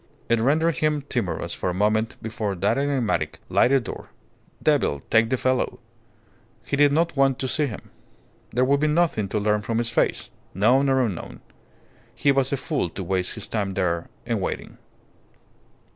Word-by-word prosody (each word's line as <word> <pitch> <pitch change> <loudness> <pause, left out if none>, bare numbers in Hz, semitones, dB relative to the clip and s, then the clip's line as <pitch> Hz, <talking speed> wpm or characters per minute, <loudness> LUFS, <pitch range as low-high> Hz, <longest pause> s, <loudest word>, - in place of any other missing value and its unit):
It 115 -1 +3
rendered 155 +4 +2
him 150 -1 0
timorous 115 -8 -2
for - - -2
a 90 - -3
moment 110 +3 +1
before 110 -2 -3
that 95 +3 +1
enigmatic, 140 -5 0
lighted 135 0 +3
door. - - -8 0.5
Devil 70 - +2
take 115 0 +4
the 130 - +1
fellow! 130 +1 0 0.9
He - - -1
did 145 0 +5
not 165 +2 +1
want 135 -2 +3
to 135 - -2
see 150 +3 +1
him. 110 - -9 0.6
There 125 +2 +1
would 140 +2 +3
be 155 - +2
nothing 155 - +1
to 105 - -1
learn 105 0 +1
from 115 +2 -2
his 115 0 -1
face, - - 0 0.2
known 125 +8 +4
or 130 -1 +3
unknown. 95 -7 -6 0.7
He 140 - +3
was 135 -1 +1
a 140 - +1
fool 145 - -2
to 95 - -6
waste 90 0 -1
his 110 - -4
time 100 -3 -2
there 85 -3 -1 0.2
in - - -1
waiting. - - -5
120 Hz, 175 wpm, -24 LUFS, 105-140 Hz, 0.9 s, did